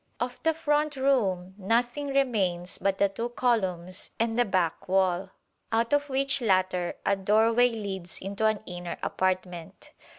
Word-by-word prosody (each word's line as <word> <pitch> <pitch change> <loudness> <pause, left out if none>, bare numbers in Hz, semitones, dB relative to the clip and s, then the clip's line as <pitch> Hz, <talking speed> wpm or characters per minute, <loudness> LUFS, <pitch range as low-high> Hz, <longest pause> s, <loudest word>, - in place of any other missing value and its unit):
Of 245 +1 -4
the 320 -1 +1
front 300 -1 0
room 200 -10 +1
nothing 240 +8 0
remains 205 -11 0
but 195 -1 0
the 200 - +4
two 230 +5 -4
columns 190 -8 -1
and 230 0 +1
the 245 0 +3
back 185 -5 -1
wall, 190 0 +2 0.4
out 230 +3 +1
of 290 0 +2
which 270 0 +1
latter 185 -4 +1
a 200 - +3
doorway 225 +5 +3
leads 195 -6 -5
into 200 +3 -1
an 215 -1 0
inner 175 -1 -6
apartment. 185 -2 -3
205 Hz, 145 wpm, -27 LUFS, 185-245 Hz, 0.4 s, the